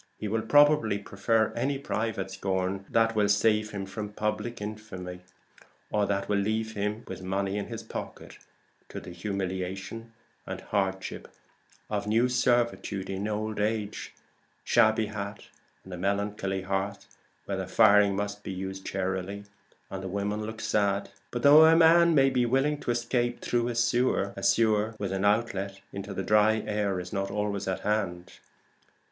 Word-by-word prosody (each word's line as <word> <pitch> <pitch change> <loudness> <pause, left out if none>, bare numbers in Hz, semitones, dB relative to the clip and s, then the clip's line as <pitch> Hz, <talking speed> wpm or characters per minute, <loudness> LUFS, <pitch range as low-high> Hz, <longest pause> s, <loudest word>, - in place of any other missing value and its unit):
He 110 - -4
will 110 +2 0
probably 145 -3 +4
prefer 105 +2 0
any 135 +4 0
private 110 -6 -3
scorn 95 0 -2
that 115 0 +2
will 105 -1 +2
save 105 +1 +3
him 100 -2 -5
from 105 +1 -6
public 105 +3 -2
infamy, 105 -4 -7 0.7
or 105 -1 +1
that 100 0 -1
will 100 -1 +1
leave 110 +2 -1
him 105 +2 -2
with - - -7
money 95 +1 -2
in 105 - -3
his 115 -1 -6
pocket, 110 - -8 0.5
to - - -6
the - - -10
humiliation 95 +3 -4 0.4
and - - -4
hardship 95 -2 -2 0.6
of 105 -1 -3
new 115 +4 +3
servitude 120 -6 0
in 95 +2 -3
old 110 0 -3
age, 105 0 -2
a - - -27 0.4
shabby 110 0 +4
hat 105 -1 -6 0.4
and 95 - -10
a - - -5
melancholy 100 0 -1
hearth, 95 +1 -2 0.4
where - - -3
the - - -4
firing 100 -1 +5
must 105 +1 -3
be 100 - -6
used 95 +1 -5
charily 95 +1 -3 0.5
and 95 - -4
the 95 - -5
women 100 +2 -2
look 110 0 -7
sad. 100 -2 0 0.2
But 120 -1 -4
though 150 +2 +9
a 160 +1 +7
man 170 0 +6
may 135 -1 +5
be 125 -2 +2
willing 135 +4 +1
to - - -6
escape 120 0 0
through 120 -1 0
a 120 - -3
sewer, 120 -4 +1
a 100 - -7
sewer 110 0 +2
with 100 -2 -3
an 95 +1 -1
outlet 100 -2 0
into 100 0 -6
the 95 - -3
dry 105 +1 +3
air 105 -3 -1
is 90 +1 -7
not 100 -1 -1
always 100 -1 -2
at 95 - -2
hand. 95 -4 -2
105 Hz, 165 wpm, -28 LUFS, 95-115 Hz, 0.7 s, though